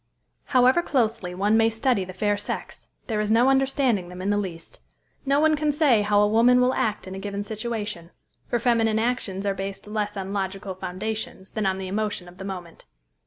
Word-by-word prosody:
However 255 +4 +4
closely 225 - -1
one 205 +4 +2
may 225 0 +4
study 225 -2 +1
the 185 - -8
fair 205 +2 0
sex, 205 - -5 0.2
there 220 -3 -2
is 210 0 -1
no 235 +4 +5
understanding 265 -8 +2
them 180 0 -9
in 195 +2 -1
the - - +2
least. 170 -5 -7 0.5
No 280 +1 +3
one 310 0 +4
can 300 0 +1
say 285 -7 +4
how 205 0 +3
a - - +4
woman 235 +4 +5
will 250 +1 +3
act 215 -3 -1
in 185 - -7
a 190 - -6
given 200 0 -4
situation; 210 -5 -4 0.4
for 240 - 0
feminine 230 -2 +2
actions 220 -4 -1
are 200 - +1
based 195 0 -6
less 210 -1 -3
on 195 0 -4
logical 195 0 -3
foundations 190 +1 -5
than 215 -3 -1
on 190 0 0
the 190 -1 -5
emotion 205 -2 -2
of 180 +1 -15
the 190 - -6
moment. 180 -4 -8
210 Hz, 205 wpm, -25 LUFS, 195-235 Hz, 0.5 s, no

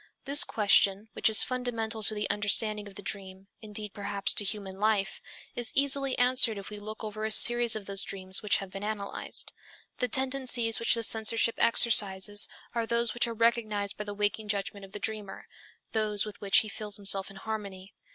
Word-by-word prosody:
This 285 +2 +6
question, 205 0 +1
which - - +1
is 220 - +4
fundamental 230 -3 -4
to 215 +1 +3
the 210 0 -2
understanding 210 0 0
of 200 - -14
the 205 - -10
dream, 190 -1 -5 0.2
indeed 210 -1 -7
perhaps 200 0 -2
to - - +1
human 195 -2 -4
life, 210 -2 -1 0.3
is 240 -2 0
easily 275 -1 +2
answered 245 -3 +2
if 200 +1 -10
we 210 - -7
look 215 +2 -9
over 215 0 -7
a 220 - -2
series 240 +1 +7
of 215 -2 -7
those 195 0 +3
dreams 190 -1 0
which 210 -2 +2
have 195 -1 -9
been 195 +1 -8
analyzed. 210 -1 -2 0.5
The 250 - -1
tendencies 255 -3 0
which 230 - +2
the 230 - -2
censorship 225 +1 +2
exercises 205 -3 +2 0.3
are 230 -1 -3
those 235 0 +1
which 240 - 0
are 230 - -6
recognized 215 -3 -1
by 210 - -6
the 205 0 -7
waking 210 +1 -2
judgment 200 -1 -4
of 195 - -19
the - - -5
dreamer, 210 -3 -6 0.5
those 215 -2 -1
with 210 -1 -11
which 195 -1 +3
he 220 - -7
feels 210 -1 -3
himself 195 -1 +2
in 195 - -14
harmony. 200 -2 -8
215 Hz, 190 wpm, -27 LUFS, 200-230 Hz, 0.5 s, series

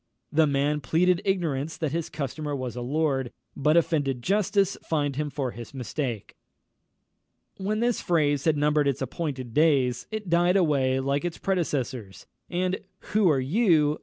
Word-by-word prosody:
The 160 0 +4
man 145 +1 +1
pleaded 175 +7 +2
ignorance 165 -6 -1
that 155 -4 -2
his 165 +1 -2
customer 150 +1 -4
was 130 -4 -4
a 125 - -4
lord, 135 -1 0 0.2
but 150 +4 +3
offended 140 -7 +1
justice 200 - +2
fined 145 -4 -1
him 150 +1 -2
for 135 -3 -3
his 120 +4 -10
mistake. 125 -3 -4 1.2
When 210 +3 -1
this 240 -1 +1
phrase 145 -5 +1
had 160 -2 +3
numbered 150 0 +2
its 135 -1 0
appointed 130 -3 -4
days, 135 -5 +2
it 215 -2 -5
died 175 +2 +3
away 135 -7 +2
like 140 +2 0
its 175 -1 -3
predecessors, 130 - -2 0.2
and 185 +1 -1 0.3
"_Who 210 -2 +4
are 145 -4 +3
you? 155 - +2
150 Hz, 155 wpm, -26 LUFS, 135-170 Hz, 1.2 s, The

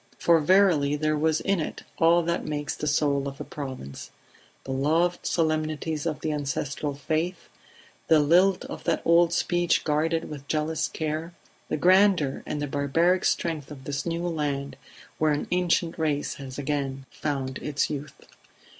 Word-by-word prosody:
For 170 -1 +4
verily 160 -4 +4
there 155 +1 0
was 155 +1 +1
in 195 -2 +1
it 155 - -5 0.2
all 170 +1 +5
that 170 +1 -1
makes 150 -1 -3
the 150 - -4
soul 140 -1 +1
of 140 0 -6
the - - -5
Province: 130 - -7 0.5
the 135 - -6
loved 160 +6 +1
solemnities 155 -1 -1
of 155 - -3
the 155 - -1
ancestral 145 0 -3
faith; 160 +5 -2 0.6
the 160 - +6
lilt 180 +6 +4
of - - -8
that - - 0
old 170 0 +5
speech 175 0 +1
guarded 160 +2 0
with 145 -2 -9
jealous 155 0 0
care; 160 +2 -4 0.3
the - - 0
grandeur 185 -4 +4
and 150 - -3
the 145 - -1
barbaric 155 +6 +1
strength 160 -5 -1
of 140 -3 -10
this 140 +1 -3
new 170 0 -2
land 145 -4 -2 0.4
where 155 -1 +3
an 145 - -2
ancient 175 -2 +1
race 150 -2 0
has 130 -1 -8
again 140 -2 -2
found 135 -3 -3
its 145 0 -1
youth. 145 0 -5
155 Hz, 160 wpm, -26 LUFS, 145-170 Hz, 0.6 s, the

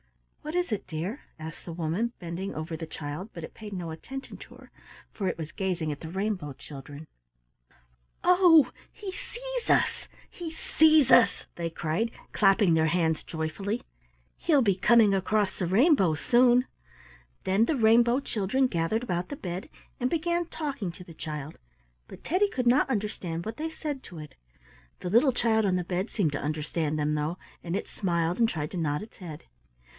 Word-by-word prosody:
"What 305 +3 -5
is 355 -6 0
it, 210 - -2
dear?" 175 - -4 0.2
asked 160 0 -8
the 170 - -6
woman, 175 +8 -1
bending 175 +3 -5
over 160 +2 -4
the 160 0 -6
child, 155 +6 -6
but 170 - -7
it - - -8
paid 215 -1 -9
no 175 -4 -4
attention 265 +12 -8
to - - -13
her, - - -16 0.4
for 195 - -3
it - - -1
was 160 -2 -6
gazing 175 -5 -2
at 145 - -5
the 160 - -7
rainbow 190 -5 -2
children. 145 +2 -10 1.2
"Oh, 355 -4 +6 0.2
he 410 -3 -7
sees - - -6
us! - - +2 0.2
he 340 -2 -7
sees 315 -3 +4
us!" 240 - +5
they 170 -1 -2
cried, 165 +7 -1 0.2
clapping 195 -3 +4
their 160 0 +3
hands 160 -1 +1
joyfully. 195 +8 -3 0.5
"He'll 295 -6 +3
be 200 -3 +4
coming 220 +1 +5
across 195 +1 +1
the 180 - 0
rainbow 195 - +4
soon." 245 +7 +4 0.8
Then 195 +4 +3
the 310 - +1
rainbow 235 +1 +5
children 245 +1 0
gathered 205 +2 0
about 180 -6 -2
the - - -4
bed 180 -6 -5 0.3
and 250 - +1
began 340 +2 0
talking 280 - -4
to 180 - -11
the 170 - -12
child, 150 -1 -6 0.5
but - - -12
Teddy 385 +5 +2
could 250 -9 -1
not 260 +3 +4
understand 195 -7 -2
what 220 +2 -5
they 320 +1 -2
said 300 -4 -5
to 175 - -11
it. 150 -2 -9 0.7
The 180 - -3
little 245 +6 +5
child 225 -2 +2
on 190 -3 +2
the 180 - 0
bed 185 +4 -2
seemed 180 -9 0
to 145 - -3
understand 155 +1 -2
them 150 0 0
though, 150 +3 -1 0.3
and 170 +1 -2
it - - -3
smiled 170 -2 -1
and 230 -1 +4
tried 150 -5 -3
to 185 - -5
nod 150 +1 -1
its 220 - -14
head. 165 -5 -8
195 Hz, 180 wpm, -28 LUFS, 165-245 Hz, 1.2 s, Oh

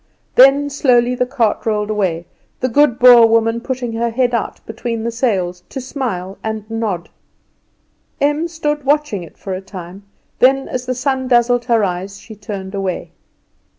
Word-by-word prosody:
Then 275 +2 +5
slowly 250 -3 +3
the 250 0 -1
cart 235 -5 0
rolled 210 -1 -1
away, 180 -5 -1 0.3
the 255 - 0
good 265 -1 +3
Boer 245 -2 +8
woman 225 +1 +1
putting 250 -2 -4
her 235 +1 -1
head 245 +1 0
out 235 - -2
between 225 0 -4
the 235 - -2
sails 190 -7 -1
to 270 - -5
smile 230 -9 -4
and 220 -1 -4
nod. 215 -7 -3 1.1
Em 295 +3 +1
stood 300 -3 -3
watching 290 -7 0
it 170 - -12
for 195 - -6
a 185 - -4
time, 185 -1 -10 0.4
then 270 +1 +4
as 250 0 -4
the 255 - -1
sun 260 0 -1
dazzled 240 -1 +3
her 230 -3 +2
eyes 190 +1 -3
she 220 - -12
turned 200 -2 -7
away. 195 -2 -3
235 Hz, 165 wpm, -17 LUFS, 205-255 Hz, 1.1 s, Boer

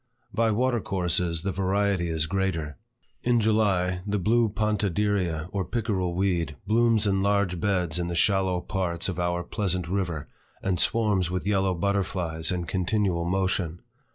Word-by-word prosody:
By 115 0 +2
water 120 +2 +1
courses, 90 -3 -1
the 100 - -1
variety 95 -1 0
is 80 -1 0
greater. 85 -4 -2 0.4
In 120 -1 +2
July, 100 -5 +2
the 105 0 0
blue 115 +4 +2
pontederia 100 -5 0
or 100 -1 -1
pickerel 95 -4 -1
weed 90 -5 0
blooms 115 0 +3
in 95 -1 +2
large 100 -3 +1
beds 90 -3 0
in 85 - -1
the 85 - -3
shallow 95 -1 +2
parts 85 -3 -2
of 90 -1 -4
our 85 0 0
pleasant 90 -4 -1
river, 90 -5 -2 0.4
and 95 -3 0
swarms 105 -6 +2
with 90 0 -3
yellow 95 -2 +1
butterflies 90 -4 0
in 90 -1 -2
continual 95 -1 0
motion. 90 -2 -1
95 Hz, 150 wpm, -26 LUFS, 85-105 Hz, 0.4 s, blooms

